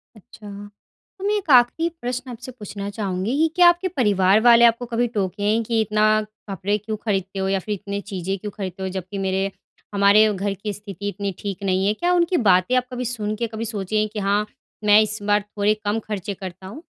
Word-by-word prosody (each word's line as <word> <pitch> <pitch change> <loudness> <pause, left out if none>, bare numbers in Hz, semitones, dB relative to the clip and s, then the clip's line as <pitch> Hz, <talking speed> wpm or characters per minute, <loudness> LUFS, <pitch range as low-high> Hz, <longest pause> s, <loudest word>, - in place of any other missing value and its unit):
अच्छा, 210 0 -14 0.7
तो 380 - -8
मैं 415 +1 +2
एक 380 -6 -6
आखिरी 255 +7 +5
प्रश्न 250 +1 -4
आपसे 245 +2 -9
पूछना 205 -4 -7
चाहूँगी 200 +2 -2
कि 320 - +4
क्या 355 -1 +7
आपके 350 +2 +1
परिवार 205 - +3
वाले 235 0 +7
आपको 235 +1 +3
कभी 240 0 0
टोके 205 -3 -3
हैं 220 +2 +2
कि, 225 0 +1
इतना 215 0 +2 0.3
कपड़े 195 +2 -1
क्यों 215 +1 -5
खरीदते 195 -2 -1
हो? 190 - 0
या 195 - +1
फिर 210 +3 -4
इतनी 200 +1 -5
चीज़ें 195 -1 -4
क्यों 210 +2 -6
खरीदते 190 -2 -5
हो? 190 - -2
जबकि 190 +1 -6
मेरे 190 +1 0 0.4
हमारे 205 +2 +5
घर 200 +1 -2
की 200 +2 -5
स्थिति 205 0 -7
इतनी 200 -1 -3
ठीक 200 -1 -5
नहीं 190 0 +1
है, 210 - +3
क्या 350 +10 0
उनकी 350 0 +2
बातें 185 +7 +4
आप 250 - +1
कभी 250 0 -4
सुन 215 -3 -3
के 235 +1 -2
कभी 225 +1 -5
सोचे 215 -1 -3
हैं 215 - +1
कि 215 - -3
हाँ, 205 +1 +1 0.4
मैं 210 0 +7
इस 215 0 -2
बार 205 0 +2
थोड़े 205 0 0
कम 210 +2 0
खर्चे 205 -1 -4
करता 185 0 -9
हूँ? 270 - -10
210 Hz, 215 wpm, -22 LUFS, 195-230 Hz, 0.7 s, क्या